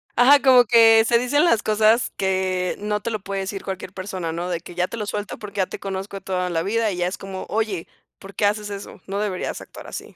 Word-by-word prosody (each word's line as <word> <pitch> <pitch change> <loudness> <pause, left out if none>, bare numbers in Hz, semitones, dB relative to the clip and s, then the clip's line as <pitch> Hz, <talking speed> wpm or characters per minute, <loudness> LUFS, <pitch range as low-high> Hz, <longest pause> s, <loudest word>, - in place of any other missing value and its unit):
Ajá, 270 +4 +7
como 255 -2 +7
que 225 0 +6
se 235 - +4
dicen 270 +6 +2
las 230 -11 +3
cosas 220 +2 +3
que 185 -1 0
no 210 0 -2
te 230 - -3
lo 215 -2 -3
puede 195 0 -4
decir 195 +1 -5
cualquier 190 -1 -6
persona, 185 -3 -4
¿no?, 170 +2 -4
de 175 -2 -2
que 175 +1 -12
ya 180 +1 +1
te - - -7
lo 210 -3 -4
suelto 205 0 -4
porque 205 -1 -9
ya 190 - +2
te - - -8
conozco 195 0 -5
de - - -9
toda 180 -1 -2
la 165 -1 0
vida, 215 +4 0
y 180 - -5
ya 175 0 0
es 185 - -4
como: 190 -1 -7
"Oye, 215 -5 -2 0.3
¿por 195 0 -12
qué 210 - +1
haces 210 0 0
eso?, 200 0 -8
no 195 +1 -3
deberías 200 -3 -3
actuar - - -12
así". - - -8
200 Hz, 255 wpm, -22 LUFS, 185-220 Hz, 0.3 s, Ajá